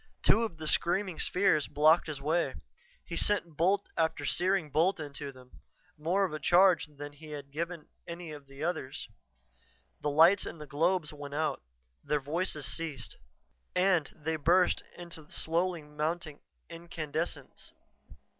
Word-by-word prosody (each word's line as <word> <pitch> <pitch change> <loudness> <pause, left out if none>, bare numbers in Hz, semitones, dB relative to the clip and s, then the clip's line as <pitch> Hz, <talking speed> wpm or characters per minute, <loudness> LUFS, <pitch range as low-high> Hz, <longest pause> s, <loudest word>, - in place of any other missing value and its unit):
Two 225 - +5
of 220 -8 -2
the 160 - -7
screaming 175 +1 +1
spheres 180 -6 +3
blocked 155 +4 +4
his 150 -3 -4
way; 150 0 0 0.5
he 170 - -5
sent 170 -3 +2
bolt 190 +6 +2
after 160 -3 0
searing 180 -1 +1
bolt 175 +5 +3
into 145 -1 -6
them, 130 -1 -17 0.4
more 175 +6 +1
of 175 - -5
a 155 - -3
charge 175 +2 +5
than 145 -1 -9
he 155 +2 -13
had 145 -2 -7
given 170 +1 -4 0.2
any 170 -1 -6
of 145 -2 -10
the 140 +2 -8
others. 160 -6 -3 0.9
The 150 - -1
lights 165 +7 +5
in - - -7
the 150 - -8
globes 160 +2 +1
went 145 -1 -7
out; 155 -2 0 0.4
their 150 - +1
voices 150 +1 -2
ceased. 165 -2 -4 0.6
And 180 -4 +3
they 160 +1 -2
burst 175 +4 +3 0.2
into 165 -3 -8
slowly 170 0 0
mounting 150 +1 -3 0.3
incandescence. 165 -1 -5
160 Hz, 145 wpm, -31 LUFS, 150-175 Hz, 0.9 s, Two